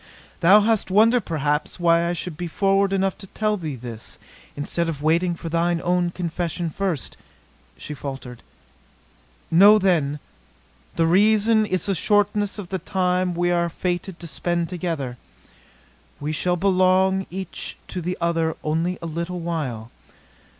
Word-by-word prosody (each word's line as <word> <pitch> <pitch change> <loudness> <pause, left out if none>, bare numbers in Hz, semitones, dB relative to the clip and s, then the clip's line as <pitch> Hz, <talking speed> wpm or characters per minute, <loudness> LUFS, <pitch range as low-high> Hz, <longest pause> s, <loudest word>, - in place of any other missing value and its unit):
"Thou 190 +5 +7
hast 220 -2 +1
wonder, 225 +5 +4
perhaps, 150 -1 -2
why 170 0 +3
I - - 0
should 175 -1 -5
be 175 +3 -4
forward 195 +3 +2
enough 195 -1 +1
to 195 - -9
tell 215 +2 -1
thee 160 -7 -5
this 115 -2 -8 0.4
instead 165 +4 -1
of 150 -3 -5
waiting 170 +3 +2
for 165 - -8
thine 170 +1 +1
own 175 0 +1
confession 170 -1 -3
first," 180 -6 -3 0.6
she 150 - -7
faltered. 135 -3 -7 1.1
"Know, 200 +6 +8
then 160 -8 +1 0.8
the 165 - +2
reason 215 +4 +4
is 185 -2 -1
the 200 - +1
shortness 205 +2 +1
of 195 -4 -7
the 190 - -2
time 180 -2 0
we 175 +1 +1
are 170 -1 +1
fated 175 +1 -3
to 170 - -8
spend 170 +1 -2
together. 165 -9 -3 1.0
We 150 +1 -3
shall 175 +4 0
belong 190 +1 +2
each 190 +2 -5
to 180 - -4
the 180 +2 -3
other 165 -1 0
only 165 +4 -1
a - - -3
little 170 +2 -4
while. 135 -10 -4
175 Hz, 150 wpm, -23 LUFS, 165-190 Hz, 1.1 s, Know